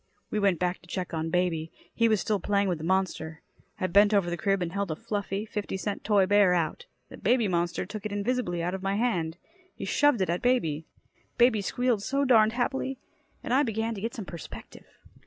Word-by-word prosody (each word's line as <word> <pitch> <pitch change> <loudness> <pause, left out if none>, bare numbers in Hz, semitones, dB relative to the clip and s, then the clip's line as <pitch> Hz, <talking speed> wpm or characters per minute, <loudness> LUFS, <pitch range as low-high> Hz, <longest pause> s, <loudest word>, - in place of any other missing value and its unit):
We 215 - 0
went 200 -4 +3
back 180 +2 -1
to 175 - -19
check 180 -1 -4
on 160 0 -2
baby. 165 -2 0 0.2
He 230 -1 +3
was 215 -2 +3
still 210 0 0
playing 200 +1 +1
with 175 -4 -1
the - - -7
monster. 170 -3 -1 0.4
I 185 - 0
bent 205 +4 +5
over 180 -4 +2
the - - 0
crib 195 +1 0
and 170 - -3
held 200 0 -2
a 155 - -2
fluffy, 205 +3 -3
fifty 210 -3 -4
cent 200 +1 -4
toy 205 -3 +4
bear 200 -2 +4
out. 160 -3 -2 0.2
The - - -10
baby 235 0 +2
monster 175 0 -1
took 205 +2 -7
it 215 - -4
invisibly 205 -4 -1
out 180 +2 -1
of 190 - -4
my 195 +1 -1
hand. 175 -8 0 0.4
He - - -6
shoved 290 -7 +3
it 185 - +1
at 175 - -1
baby. 165 -12 +1 0.5
Baby 240 -3 +4
squealed 245 +2 0
so 275 +6 0
darned 220 -4 +5
happily. 265 +2 -1 0.5
And - - -2
I 270 - +5
began 225 -2 -1
to 200 - -7
get 230 +2 -3
some 215 - -6
perspective. 170 -3 -10
200 Hz, 215 wpm, -28 LUFS, 175-220 Hz, 0.5 s, bent